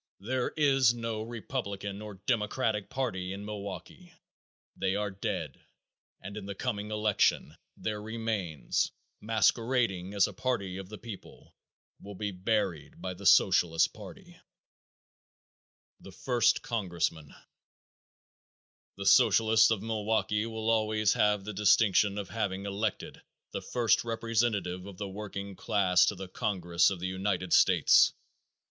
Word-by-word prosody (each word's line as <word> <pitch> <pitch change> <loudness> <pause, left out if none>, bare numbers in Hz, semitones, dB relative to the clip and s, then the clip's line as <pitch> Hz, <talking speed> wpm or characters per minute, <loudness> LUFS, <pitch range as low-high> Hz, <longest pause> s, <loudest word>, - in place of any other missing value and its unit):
There 125 +5 -1
is 135 -5 +4
no 115 -2 -3
Republican 105 -3 -5
or 105 -1 -8
Democratic 110 -2 0
party 95 -8 -3
in 100 +1 -7
Milwaukee. 105 - -8 0.6
They 95 0 -1
are 105 0 -2
dead, 95 - -4 0.6
and 100 - -9
in 100 -2 -7
the 100 - -5
coming 105 -3 -3
election 105 -2 +1 0.2
their 105 -1 -3
remains, 105 - -2 0.3
masquerading 110 -3 +1
as 100 - +5
a - - -8
party 100 -8 -2
of 95 -1 -8
the 105 - -8
people, 110 -4 -11 0.5
will 100 0 -9
be 105 +1 -3
buried 90 -6 -2
by 95 - -4
the 95 +2 -3
Socialist 85 -4 +4
party. - - -12 1.6
The - - -12
First 125 -3 +1
Congressman. 85 -8 -3 1.6
The 100 - -6
Socialists 110 0 +5
of 110 -3 0
Milwaukee 110 0 0
will 110 0 -1
always 110 -1 +2
have 105 -2 +1
the 105 - -5
distinction 105 0 +3
of 100 -3 -5
having 100 -3 -3
elected 100 +1 -3 0.3
the - - -4
first 120 -2 +1
representative 110 -5 -1
of 100 -3 -10
the 100 - -4
working 100 0 -7
class 95 -3 +3
to 105 - 0
the 95 0 -7
congress 90 -5 +1
of 95 - -4
the 90 - -3
United 95 -2 -2
States. - - +5
105 Hz, 130 wpm, -30 LUFS, 95-110 Hz, 1.6 s, as